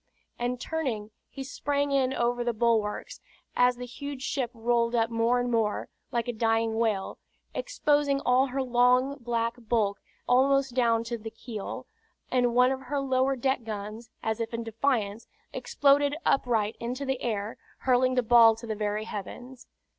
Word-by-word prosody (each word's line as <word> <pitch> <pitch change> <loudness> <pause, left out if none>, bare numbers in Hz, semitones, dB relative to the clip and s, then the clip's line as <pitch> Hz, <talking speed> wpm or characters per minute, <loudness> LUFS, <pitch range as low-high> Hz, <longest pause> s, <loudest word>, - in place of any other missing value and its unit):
and 245 +1 -1
turning, 245 -10 -3 0.2
he 270 - -7
sprang 285 +1 -1
in 265 -2 +2
over 240 -1 0
the 240 0 0
bulwarks, 220 -2 0 0.3
as 245 0 +4
the 250 +1 -7
huge 270 +2 -7
ship 265 -4 -1
rolled 235 0 +1
up 230 0 +1
more 230 +2 +2
and 245 0 -1
more, 225 -3 0 0.2
like 235 -1 -1
a 245 - -1
dying 225 0 +1
whale, 215 -4 -1 0.3
exposing 290 - +1
all 255 +1 +3
her 265 +1 -2
long 250 +2 +3
black 235 -1 -1
bulk 215 -4 0 0.3
almost 270 +1 +3
down 230 -2 +2
to 235 0 -4
the 225 +1 -6
keel, 220 -2 -7 0.5
and 245 -2 +2
one 250 +1 +5
of 265 0 -3
her 280 +2 -2
lower 265 0 +1
deck 265 0 0
guns, 215 +1 -6
as 220 -1 -1
if 230 0 -3
in 230 - -3
defiance, 225 -2 -1 0.3
exploded 285 0 +2
upright 225 -5 +1
into 250 +4 -4
the 265 -1 -2
air, 215 -2 -2 0.2
hurling 255 0 +3
the 250 - +2
ball 230 -1 +7
to 230 +2 -10
the 220 - -2
very 210 0 -2
heavens. 245 +5 -8
240 Hz, 165 wpm, -28 LUFS, 225-260 Hz, 0.5 s, ball